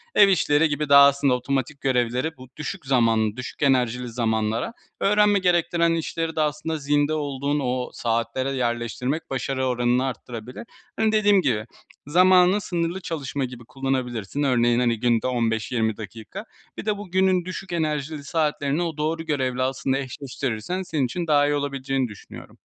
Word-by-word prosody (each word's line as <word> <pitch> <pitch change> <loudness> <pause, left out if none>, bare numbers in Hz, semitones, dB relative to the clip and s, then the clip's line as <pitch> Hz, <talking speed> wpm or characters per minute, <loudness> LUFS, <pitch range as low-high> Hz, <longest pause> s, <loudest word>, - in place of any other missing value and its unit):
Ev 205 - +8
işleri 160 -4 +3
gibi 145 0 -2
daha 140 0 +9
aslında 140 -1 +2
otomatik 135 +3 -2
görevleri 130 +3 0
bu 130 - -12
düşük 150 +2 -5
zamanlı, 115 -4 +2
düşük 125 - -7
enerjili 125 -2 +2
zamanlara, 115 - -1 0.3
öğrenme 205 0 +4
gerektiren 170 -2 +2
işleri 165 0 -2
de 155 - +1
aslında 155 +1 -1
zinde 145 +1 +1
olduğun 145 -1 -1
o 125 -2 -2
saatlere 115 +3 -1
yerleştirmek 125 +3 -2
başarı 130 0 -2
oranını 125 +1 +1
arttırabilir. 125 -1 -6 0.4
Hani, 220 -1 +3
dediğim 205 -2 +4
gibi 115 -9 0 0.4
zamanı 185 +4 +5
sınırlı 175 0 -2
çalışma 145 -5 -3
gibi 125 -1 -9
kullanabilirsin. 130 -2 -2
Örneğin, 120 -3 +3
hani, 120 -3 +1
günde 120 0 +1
15-20 115 -2 0
dakika 110 0 -8 0.3
birde 210 -1 -2
bu 205 -3 -9
günün 185 -1 +2
düşük 185 +1 -6
enerjili 155 -2 -2
saatlerini 150 0 0
o 165 -3 -4
doğru 160 +2 -1
görevle 130 -5 -1
aslında 135 +1 0
eşleştirirsen 135 - -4
senin 155 -6 -1
için 170 +8 -4
daha 145 -2 +4
iyi 145 - +1
olabileceğini 135 -2 -1
düşünüyorum. 105 -3 -12
140 Hz, 150 wpm, -24 LUFS, 125-160 Hz, 0.4 s, daha